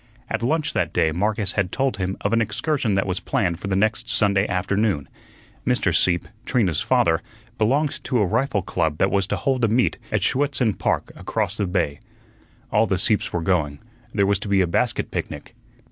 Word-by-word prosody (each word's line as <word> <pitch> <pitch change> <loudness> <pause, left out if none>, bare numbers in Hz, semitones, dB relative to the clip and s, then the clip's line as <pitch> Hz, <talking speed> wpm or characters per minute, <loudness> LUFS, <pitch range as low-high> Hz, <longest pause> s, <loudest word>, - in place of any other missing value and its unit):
At - - -1
lunch 150 +5 0
that - - -1
day 80 - +2
Marcus 105 +3 0
had 100 -4 -1
told 135 -6 0
him 95 0 -2
of 100 - 0
an 115 - +3
excursion 125 -1 0
that 95 - +1
was 95 -1 -1
planned 90 -4 -1
for 100 - -5
the 95 - 0
next 110 +3 0
Sunday 100 -2 +2
afternoon. 100 -3 0 0.6
Mr. - - +1
Sieppe, 85 -1 +2 0.2
Trina's 100 - +1
father, 80 0 +2 0.4
belonged 135 +7 +1
to 130 - 0
a 105 - +3
rifle 105 0 0
club 80 -4 -1
that 95 - +2
was 100 -2 +1
to - - -1
hold 130 -3 0
a - - +5
meet 120 +4 +1
at 110 -4 +1
Schuetzen 130 -4 +1
Park - - -1
across 105 -3 -2
the 100 - 0
bay. 85 -6 -1 0.7
All 110 +2 +3
the 95 - +1
Sieppes 105 +3 +1
were 85 -1 -2
going; 80 -6 0 0.3
there 100 -2 +2
was 100 -1 +2
to 105 - -6
be 100 -1 +3
a - - +3
basket 85 - 0
picnic. - - -5
100 Hz, 195 wpm, -23 LUFS, 90-115 Hz, 0.7 s, a